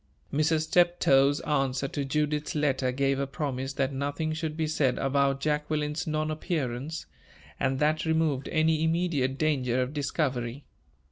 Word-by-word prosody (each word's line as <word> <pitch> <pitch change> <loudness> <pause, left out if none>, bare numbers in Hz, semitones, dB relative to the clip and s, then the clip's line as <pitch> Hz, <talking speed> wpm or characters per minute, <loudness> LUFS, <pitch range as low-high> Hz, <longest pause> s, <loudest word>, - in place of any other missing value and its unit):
Mrs. 155 +2 +2
Steptoe's 155 -4 +3
answer 135 -2 0
to 145 - -2
Judith's 150 +3 -1
letter 135 -3 +1
gave 135 +1 +1
a 140 - -1
promise 135 -2 -3
that 135 0 -1
nothing 145 +3 -2
should 155 -1 -4
be 160 - 0
said 145 -4 +1
about 135 0 +1
Jacqueline's 150 +2 -1
non 155 0 -1
appearance; 155 -2 -3 0.5
and 135 -1 +1
that 150 +2 +1
removed 160 -4 0
any 160 0 +2
immediate 160 -6 0
danger 130 -5 +1
of 130 +2 -1
discovery. 140 -3 -2
145 Hz, 140 wpm, -28 LUFS, 135-155 Hz, 0.5 s, Steptoe's